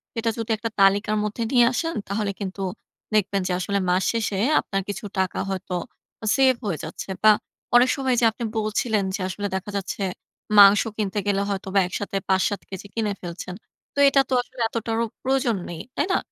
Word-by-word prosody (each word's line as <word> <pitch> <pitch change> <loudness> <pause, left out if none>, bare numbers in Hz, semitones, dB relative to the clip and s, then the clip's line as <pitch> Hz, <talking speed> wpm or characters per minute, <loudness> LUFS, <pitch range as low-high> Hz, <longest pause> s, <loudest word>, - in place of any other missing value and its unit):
সেটা 230 0 0
যদি 225 0 -3
একটা 230 +2 -3
তালিকার 200 +2 +4
মধ্যে 210 +2 -2
নিয়ে 245 -3 +6
আসেন 330 +5 -2
তাহলে 200 0 -1
কিন্তু 195 -1 -5 0.5
দেখবেন 200 -1 +2
যে - - -2
আসলে 200 +2 0
মাস 180 +1 +2
শেষে 215 -4 -1 0.2
আপনার 195 -1 -2
কিছু 205 +2 -4
টাকা 190 0 0
হয়তো 190 -1 -3 0.6
সেভ 265 -1 +5
হয়ে 185 -6 -1
যাচ্ছে। - - -7
বা 215 - +9 0.4
অনেক 245 +1 +7
সময় 265 -2 0
এইযে 235 - +3
আপনি 235 - -7
বলছিলেন 215 -1 0
যে - - -5
আসলে 205 +2 -3
দেখা 190 +2 -4
যাচ্ছে 200 +1 -4 0.6
মাংস 200 +1 +9 0.2
কিনতে 205 -1 -1
গেলে 200 -1 +2
হয়তো 195 -1 -3
বা 195 - +7
একসাথে 195 +1 -3
৫-৭ 190 +1 +2
কেজি 195 +1 -7
কিনে 215 -3 -1
ফেলছেন। 180 +1 -6 0.4
তো - - -19
এটা 275 0 +4
তো - - -1
আসলে 255 - -16
এতটারও 230 0 -1 0.2
প্রয়োজন 260 -3 +1
নেই। 170 -2 -6 0.2
তাই - - +1
না? - - +4
205 Hz, 185 wpm, -24 LUFS, 195-230 Hz, 0.6 s, বা